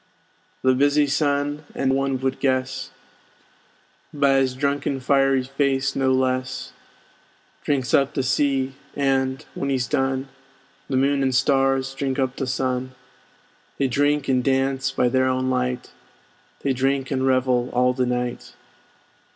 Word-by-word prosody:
The 130 0 +4
busy 145 +3 +3
Sun 145 +1 0
(and 135 -1 +1
one 135 0 0
would 130 0 -1
guess 130 0 -1 1.2
By 140 -2 +3
's 130 -1 -2
drunken 140 0 -1
fiery 135 0 +2
face 135 0 0
no 130 -1 +2
less) 130 0 -1 0.9
Drinks 135 -3 -1
up 140 0 +3
the 135 - 0
sea, 135 0 +1 0.2
and, 135 0 0
when 140 - -3
he's 130 -2 0
done, 135 +1 -1 0.6
The 130 - 0
Moon 140 +1 +2
and 130 -1 +1
Stars 135 0 +2
drink 135 -1 -2
up 130 -1 -1
the 135 - -2
Sun: 130 0 -2 0.8
They 140 - +1
drink 145 +3 +1
and 130 -2 +2
dance 135 0 +1
by 125 -2 +1
their 130 +1 +2
own 130 0 0
light; 125 0 -2 0.7
They 135 - 0
drink 135 +1 0
and 135 -1 0
revel 130 -1 +2
all 125 +1 +2
the 125 -1 0
night. 125 0 -3
135 Hz, 140 wpm, -23 LUFS, 130-140 Hz, 1.2 s, The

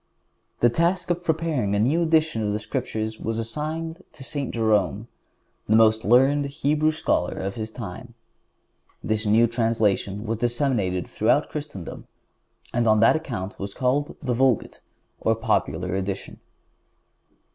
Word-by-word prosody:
The 120 - +6
task 175 +5 +1
of 175 0 -2
preparing 155 -11 0
a - - +1
new 140 +10 +2
edition 160 -7 +2
of 105 -1 0
the - - 0
Scriptures 110 +1 -4
was 115 +1 -3
assigned 155 +9 -4
to 135 - -11
St. 140 -1 -4
Jerome, 110 -1 +1 0.6
the 110 - +5
most 110 0 +5
learned 135 +6 +4
Hebrew 150 +2 +1
scholar 155 - -1
of 95 +1 -3
his 110 0 -5
time. 115 +2 -8 0.9
This 110 0 -1
new 110 +3 +5
translation 110 -3 0
was 115 0 -2
disseminated 120 - 0
throughout - - +1
Christendom, - - -7 0.7
and 120 -1 +1
on 110 0 +5
that 115 - +6
account 115 -11 -5
was 100 0 -5
called 135 +3 0
the 125 -2 0
Vulgate, 130 -1 +1 0.4
or 115 - +2
popular 90 -5 -1
edition. 95 0 -4
115 Hz, 140 wpm, -24 LUFS, 105-145 Hz, 0.9 s, The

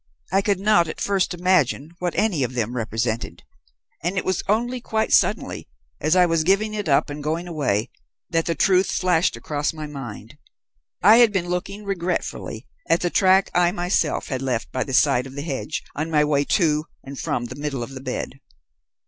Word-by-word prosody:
I 195 +1 +3
could 200 -2 0
not 200 -4 +3
at 160 - -6
first 195 -2 +1
imagine 170 -4 +1
what 175 -1 -2
any 205 -9 +1
of 125 0 -2
them 120 0 -2
represented, 115 0 -3 0.6
and 180 +4 -1
it - - -1
was 185 -2 0
only 240 +4 0
quite 220 -2 -1
suddenly, - - +1 0.3
as 155 - +2
I 180 -1 +6
was 165 -2 +1
giving 200 +5 +2
it 205 -6 -3
up 140 +1 +3
and 145 0 -6
going 165 +4 -2
away, 130 -11 -1 0.4
that 165 -1 0
the 165 - 0
truth 185 +4 +3
flashed 180 -1 +1
across 145 0 -2
my 155 -1 -6
mind. 135 -3 -9 0.6
I 215 +4 +8
had 235 -3 +6
been 180 -3 -1
looking 195 +4 -3
regretfully 180 -3 -3 0.2
at 165 - +3
the 175 - 0
track 190 0 +4
I 175 -1 +3
myself 175 -4 0
had 130 -2 -2
left 130 -3 -2
by 130 - -1
the 135 - -7
side 135 -2 +3
of 135 - -12
the 145 - -4
hedge 145 0 -4
on 155 +3 -2
my 150 -2 +3
way 145 -1 +1
to 155 -4 +2 0.2
and 135 0 -8
from 120 - -2
the 120 - -7
middle 140 -3 -3
of 120 - -8
the 130 -1 -8
bed. 130 +1 -5
165 Hz, 195 wpm, -23 LUFS, 140-185 Hz, 0.6 s, I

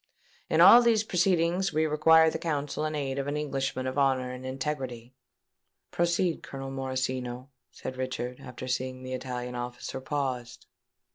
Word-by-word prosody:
In - - +3
all 240 - +10
these 230 -3 +3
proceedings 180 -1 +1
we 155 +1 +1
require 160 +1 +5
the - - -4
counsel 150 -1 -2
and 155 0 -2
aid 140 -2 -2
of 135 - -3
an 145 +1 -1
Englishman 135 -3 -2
of 130 +2 -1
honour 130 -2 +2
and 125 +1 -7
integrity." 130 -3 -4 0.8
"Proceed, 170 0 +1
Colonel 135 0 -7
Morosino," 130 -1 -3 0.2
said 130 - -7
Richard, 125 -1 -4 0.2
seeing 130 0 -3
that 130 - -7
the - - -4
Italian 125 -1 -4
officer 125 +2 -5
paused. 130 -3 -3
135 Hz, 150 wpm, -28 LUFS, 130-155 Hz, 0.8 s, all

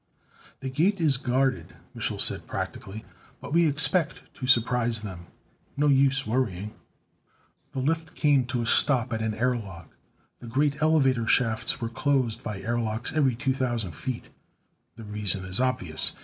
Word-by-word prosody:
"The 135 - -4
Gate 180 +9 +2
is 150 -6 +2
guarded," 130 0 0 0.2
Mich'l - - -3
said - - +1
practically, 105 +3 -5 0.3
"but - - -7
we 170 0 +5
expect 150 +3 +3
to 130 - -6
surprise 120 -2 +3
them. 90 -5 -8 0.5
No 150 - +2
use 135 -1 +3
worrying." 110 -4 -2 1.0
The 130 - -2
lift 160 +4 -1
came 140 -5 +3
to 120 -1 -1
a - - -3
stop 125 0 +3
at 110 - -2
an 110 -1 -1
air 125 +3 +1
lock. 95 -8 -9 0.4
The 120 - -10
great 145 +4 0
elevator 135 -7 +3
shafts 115 -3 +1
were 115 - -2
closed 130 -2 0
by 105 -3 -5
airlocks 115 0 -2
every 140 -6 +2
2,000 125 -6 -1
feet. 120 - -6 0.7
The 115 - -10
reason 105 -3 -2
is 95 +3 -1
obvious. 90 -11 -1
125 Hz, 150 wpm, -26 LUFS, 110-140 Hz, 1.0 s, we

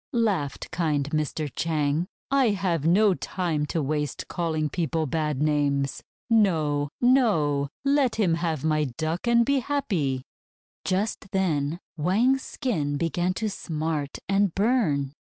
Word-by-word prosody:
laughed 200 - -1
kind 150 -5 0
Mr. 155 0 -1
Chang. 155 +1 0 0.2
"I 275 -2 +4
have 180 -6 0
no 200 +3 +5
time 170 -5 -2
to 160 0 -1
waste 150 0 -2
calling 160 -3 -1
people 160 0 -1
bad 150 -1 -1
names. 140 -2 +1 0.3
No! 160 - +2
No! 165 - +3 0.2
Let 275 -3 +3
him 195 -7 +2
have 165 -3 -1
my 155 -1 +2
Duck, 165 +6 -2
and 235 0 +4
be 275 +1 +2
happy!" 185 - -1 0.6
Just 195 +2 -1
then 165 -5 0 0.2
Wang's 225 - +2
skin 155 - -2
began 175 +3 0
to 220 - -1
smart 155 -6 -3
and 195 -2 +2
burn. 190 - +1
165 Hz, 130 wpm, -26 LUFS, 150-205 Hz, 0.6 s, no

